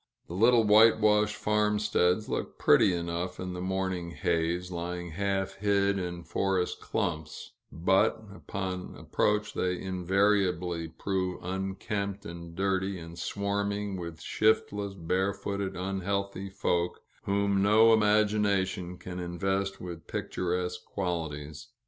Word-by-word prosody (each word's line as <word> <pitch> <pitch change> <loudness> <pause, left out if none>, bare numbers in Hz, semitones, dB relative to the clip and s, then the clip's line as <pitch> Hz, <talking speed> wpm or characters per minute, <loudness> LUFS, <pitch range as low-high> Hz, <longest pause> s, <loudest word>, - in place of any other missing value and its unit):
The - - -9
little 115 +5 +5
whitewashed 105 0 +5
farmsteads 105 -2 +1
look - - -3
pretty - - +5
enough 85 +1 -3
in 90 0 -4
the 90 - -5
morning 95 -2 -2
haze, 85 +2 -1
lying 90 0 -4
half 95 +2 -1
hid 100 -1 +2
in 90 -1 -4
forest 95 -1 0
clumps; 80 -2 -3 0.2
but 90 +7 +2
upon 90 +2 -5
approach 105 0 0
they 90 -1 -1
invariably 90 -2 +1
prove 95 +2 -3
unkempt 95 +2 -3
and 85 0 -8
dirty, 95 +1 0
and 85 0 -9
swarming 100 +1 -2
with 85 -3 -6
shiftless, 105 -1 +1
barefooted, 95 +2 -1
unhealthy 95 +1 -2
folk, 90 -2 -1 0.3
whom 100 0 +2
no 110 +3 +6
imagination 105 -4 +2
can 90 0 -7
invest 95 +3 -1
with 85 -2 -8
picturesque 90 0 -2
qualities. 80 -1 -4
95 Hz, 110 wpm, -29 LUFS, 90-100 Hz, 0.3 s, no